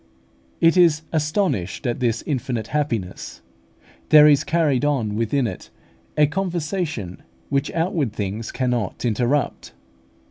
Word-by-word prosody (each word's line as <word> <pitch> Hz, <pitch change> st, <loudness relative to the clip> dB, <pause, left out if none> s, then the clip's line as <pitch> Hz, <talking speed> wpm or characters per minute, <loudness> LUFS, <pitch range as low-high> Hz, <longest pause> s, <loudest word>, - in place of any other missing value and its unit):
It 165 Hz, +2 st, +4 dB
is 165 Hz, -3 st, +4 dB
astonished 150 Hz, -, -1 dB
at 120 Hz, 0 st, -1 dB
this 115 Hz, -3 st, 0 dB
infinite 120 Hz, -5 st, -3 dB
happiness; 115 Hz, -11 st, -3 dB, 0.7 s
there 150 Hz, -1 st, +8 dB
is 145 Hz, -1 st, +5 dB
carried 155 Hz, -6 st, +1 dB
on 130 Hz, -8 st, 0 dB
within 115 Hz, +5 st, 0 dB
it 95 Hz, -5 st, -6 dB, 0.5 s
a 150 Hz, -, +6 dB
conversation 160 Hz, -, -3 dB, 0.3 s
which 140 Hz, -1 st, 0 dB
outward 165 Hz, -, 0 dB
things 105 Hz, +1 st, -4 dB
cannot 125 Hz, -5 st, -2 dB
interrupt. 120 Hz, +5 st, -1 dB
140 Hz, 115 wpm, -22 LUFS, 115-155 Hz, 0.7 s, there